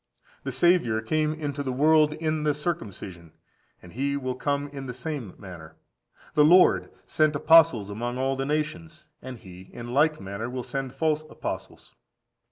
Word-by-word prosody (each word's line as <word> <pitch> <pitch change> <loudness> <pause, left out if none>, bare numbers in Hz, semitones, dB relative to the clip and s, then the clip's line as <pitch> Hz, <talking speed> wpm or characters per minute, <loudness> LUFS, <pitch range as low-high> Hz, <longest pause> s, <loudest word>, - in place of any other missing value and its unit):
The 135 - -4
Saviour 130 -5 +3
came 155 +7 0
into 145 -2 -4
the 135 -2 -2
world 150 +3 +4
in 155 0 -2
the 150 -1 +1
circumcision, 100 - -5 0.5
and 90 - -13
he 140 +3 -1
will 130 -2 -3
come 140 +2 -2
in 135 -2 -8
the 125 - -6
same 130 -5 -5
manner. 85 -5 -11 0.6
The 150 - +5
Lord 180 +5 +5 0.2
sent 155 -1 +1
apostles 155 -9 +5
among 120 +4 -4
all 135 +1 0
the 135 - -2
nations, 155 +2 -3 0.2
and 130 -1 -8
he 95 -2 -13
in 120 0 -8
like 155 +3 +3
manner 100 +4 -5
will 125 0 -4
send 135 0 -5
false 155 +1 +1
apostles. - - -7
140 Hz, 165 wpm, -26 LUFS, 120-155 Hz, 0.6 s, The